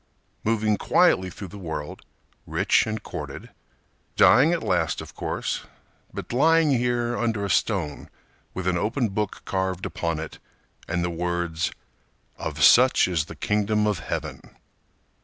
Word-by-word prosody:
Moving 110 -1 +1
quietly 95 -1 +3
through 95 +1 -9
the 100 - -10
world, 80 -4 -6 0.5
rich - - +2
and 110 -1 -4
courted. - - -7 0.6
Dying 135 +9 +6
at 170 -2 -1
last, 80 -5 0
of - - -9
course, - - -3 0.4
but - - -7
lying 160 +3 +4
here 120 -1 +1
Under 115 -4 -1
a 100 - -1
stone 85 -10 -1 0.5
with 95 - -4
an 90 -1 +1
open 115 +4 0
book 105 0 -3
carved 95 -1 -2
upon 85 -2 -2
it 80 -1 -7 0.5
And 85 +1 -1
the 85 - -1
words 85 -1 -1 0.7
_"Of - - -2
such 130 -3 +6
is 85 -4 0
the - - -10
Kingdom 105 0 +1
of 105 -4 0
Heaven." - - -5
100 Hz, 140 wpm, -25 LUFS, 85-115 Hz, 0.7 s, Dying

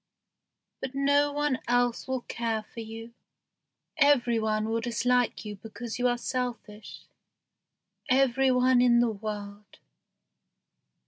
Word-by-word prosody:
But 265 0 -5
no 285 +1 +3
one 290 -2 0
else 245 +1 +1
will 260 -1 -2
care 225 -2 -3
for 230 - -12
you. 225 +1 -8 0.8
Every 260 -6 +4
one 215 0 0
will 225 +1 -1
dislike 245 0 0
you 210 -1 -6
because 225 +3 -7
you 250 - +3
are 245 0 +1
selfish 240 -4 -5 1.0
every 265 0 +3
one 250 0 +4
in 240 -1 +5
the 240 -1 +2
world." 205 -1 -7
240 Hz, 120 wpm, -28 LUFS, 220-255 Hz, 1.0 s, in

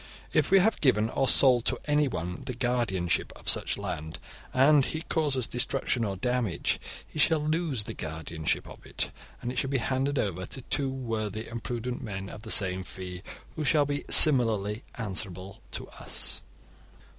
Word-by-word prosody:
If - - +2
we 195 - +6
have 210 +4 +2
given 110 -6 +2
or 135 - 0
sold 125 -4 +5
to - - 0
anyone 135 - -1
the 125 - -4
guardianship 120 -8 -1
of - - -14
such - - +2
land, 80 +1 -6 0.3
and 140 +2 +4
he 160 +4 -3
causes 145 -8 -1
destruction 125 0 -1
or 100 -3 -2
damage, 125 -3 -1 0.3
he - - -9
shall 160 +1 +3
lose 155 -7 -1
the - - -6
guardianship 80 0 -3
of - - -13
it, - - -2 0.3
and 120 - -3
it 125 - -2
shall 135 - -2
be 135 - 0
handed 135 +3 -1
over 95 -5 -2
to 130 - -1
two 135 +1 0
worthy 110 -4 -4
and 115 0 -7
prudent 120 +1 -4
men 95 -3 -6
of 105 - -10
the 110 - -10
same 95 -3 +3
'fee', 90 -1 -7 0.3
who 155 - -3
shall 145 0 +3
be 145 0 -3
similarly 115 -7 +7
answerable 95 -3 -6
to - - -5
us. - - -2
120 Hz, 170 wpm, -27 LUFS, 100-135 Hz, 0.3 s, similarly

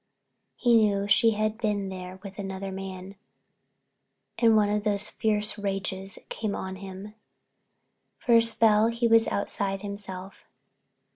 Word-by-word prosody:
Then 240 - +4
he - - +7
knew 200 -2 +2
she 225 +3 +5
had 215 +1 -2
been 205 -4 -1
there 185 0 -8
with 195 0 -10
another 195 0 -5
man 190 0 -8 1.2
and 230 -2 +5
one 205 -1 +3
of 210 0 -1
those 210 0 +2
fierce 210 -1 -1
rages 195 -1 -4
came 215 -2 -4
on 190 0 -5
him. 195 +2 -9 1.0
For 235 - +2
a - - +6
spell 225 -1 +5
he 235 +1 0
was 225 0 +4
outside 195 -1 -2
himself. 195 -2 -8
205 Hz, 140 wpm, -26 LUFS, 195-215 Hz, 1.2 s, he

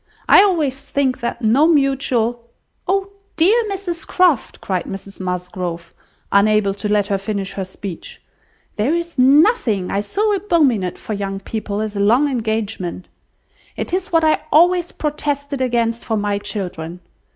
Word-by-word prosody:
I - - +8
always 315 -10 +1
think 270 -2 -1
that 235 0 -4
no 255 +8 +4
mutual—" 255 -6 +1 0.4
"Oh! 390 +1 0 0.3
dear 410 +9 +4
Mrs 375 -3 -4
Croft," 355 -10 +2
cried 185 -3 -2
Mrs 195 0 -8
Musgrove, 180 -2 -4 0.4
unable 200 0 +3
to 205 +1 -4
let 205 -1 +3
her 200 -1 0
finish 195 -1 -4
her 195 - -3
speech, 185 -1 -8 0.6
"there 245 +10 +1
is 340 -4 -4
nothing 265 - +4
I 200 - 0
so 415 - 0
abominate 295 - +1
for 220 - -6
young 195 -1 -3
people 210 0 -4
as 215 -1 -4
a - - -2
long 235 +8 +4
engagement. 220 -8 -3 0.7
It - - -4
is 375 0 -1
what 330 -1 +3
I 310 -1 +3
always 350 +2 +4
protested 285 -2 -3
against 235 -2 0
for 220 - -1
my 205 -1 -1
children. 180 -4 -5
230 Hz, 150 wpm, -19 LUFS, 200-310 Hz, 0.7 s, I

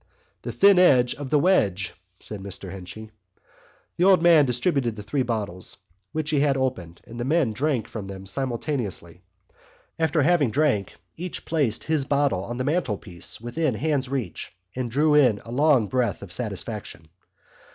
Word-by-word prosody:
"The - - -5
thin 200 -2 +5
edge 125 -9 +5
of 140 -2 -7
the 150 - +3
wedge," 100 - +2 0.3
said 105 - -7
Mr 95 -1 -7
Henchy. 100 +4 -9 0.9
The 175 - +2
old 185 -2 +5
man 165 -5 +6
distributed 125 -1 0
the 105 - -8
three 135 +7 -1
bottles 105 -7 -3 0.3
which 155 -1 -2
he 150 - +2
had 140 -1 +2
opened 95 -11 -3
and 120 +1 -10
the - - -1
men 140 -4 +1
drank 135 -2 -1
from 105 -4 -7
them 95 0 -8
simultaneously. 115 - -3 0.8
After 160 -2 +2
having 155 -4 +3
drunk 120 -7 0 0.2
each 180 +1 -5
placed 145 -9 0
his 155 -3 0
bottle 140 -8 +1
on 120 +4 -5
the 130 - -1
mantelpiece 105 - -2
within 125 +3 -1
hand's 140 0 -1
reach 130 -10 -4 0.2
and 125 -1 -2
drew 150 +5 +2
in 130 -8 +5
a 115 - -9
long 140 -2 +4
breath 125 +1 -1
of 95 - -9
satisfaction. 100 -5 -4
125 Hz, 160 wpm, -24 LUFS, 105-150 Hz, 0.9 s, man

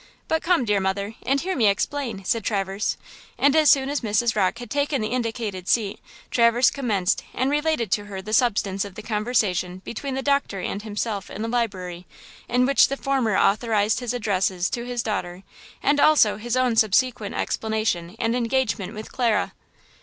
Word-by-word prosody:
But 320 0 +1
come, 340 -7 +2
dear 210 -2 +2
mother, 200 +2 -2
and 275 +2 +2
hear 375 +5 -2
me 230 -5 +3
explain!" 215 0 -1
said 225 +2 0
Traverse, 195 0 -1 0.4
and 285 +1 +3
as 310 -1 +5
soon 270 -1 +4
as 285 0 -1
Mrs. 225 +1 +1
Rocke 200 +1 +1
had 240 0 -9
taken 285 -1 0
the 215 -1 -2
indicated 225 -6 -3
seat, 210 -4 +1 0.3
Traverse 235 +1 +4
commenced 215 -9 0
and 260 +3 0
related 295 - 0
to 205 +1 0
her 200 -2 -7
the 210 +3 -6
substance 200 -5 +2
of 200 -2 -9
the 215 - -8
conversation 210 -5 0
between 265 +3 -4
the 265 - -3
doctor 280 -8 0
and 195 +2 -3
himself 210 -1 -4
in 210 - -6
the - - -2
library, 185 -7 -3 0.4
in 250 +1 +3
which 275 +1 +5
the 275 - -3
former 265 -7 0
authorized 215 0 +2
his 245 -2 -3
addresses 195 -6 0
to 240 0 -3
his 245 -1 -3
daughter, 185 -4 -4 0.4
and 290 +1 +3
also 290 -10 +5
his 240 +3 -2
own 250 -2 +2
subsequent 225 0 +2
explanation 215 -5 -2
and 230 +1 0
engagement 235 -4 -1
with 215 +1 -8
Clara. 235 -4 0
225 Hz, 180 wpm, -24 LUFS, 200-255 Hz, 0.4 s, as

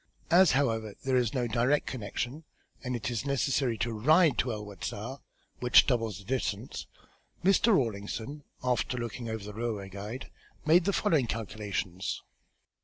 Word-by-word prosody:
As, 180 +1 +7
however, 115 -6 0
there 130 -1 +1
is 125 -1 +2
no 125 -2 +1
direct 120 +6 +2
connection 130 +5 -4 0.4
and 125 -1 -2
it 120 +1 -3
is 120 -1 -2
necessary 135 -3 +1
to 115 0 -1
ride 155 +6 +5
to 125 - +1
El 105 -1 -4
Wasta, 100 -4 -6 0.4
which 125 0 +6
doubles 115 -7 0
the 100 - -11
distance, 120 -1 -3 0.6
Mr. 195 +4 +5
Rawlinson, 115 - -2 0.2
after 125 0 0
looking 120 0 -4
over 110 -2 -4
the 105 0 -7
railway 110 -3 -3
guide, 105 +6 -7 0.3
made 165 +3 +5
the 200 - +3
following 160 - +2
calculations. 100 -4 -3
120 Hz, 150 wpm, -30 LUFS, 105-135 Hz, 0.6 s, As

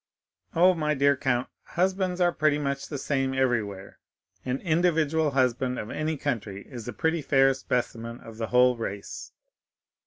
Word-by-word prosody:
"Oh, 180 +3 +6
my 150 -3 0
dear 140 +1 +4
count, 130 -1 0
husbands 185 0 -1
are 175 -1 +4
pretty 155 -3 +2
much 140 -1 -2
the 145 - -5
same 135 -1 -1
everywhere; 110 -7 -1 0.4
an 130 +1 -2
individual 160 -3 +2
husband 125 -1 +1
of 105 - -5
any 155 0 -2
country 105 -9 -3
is 120 -5 -8
a - - -3
pretty 160 0 0
fair 135 -1 +4
specimen 120 -2 -3
of 115 -1 -11
the 115 -1 -3
whole 125 0 +4
race." 100 -3 -6
135 Hz, 155 wpm, -27 LUFS, 120-155 Hz, 0.4 s, Oh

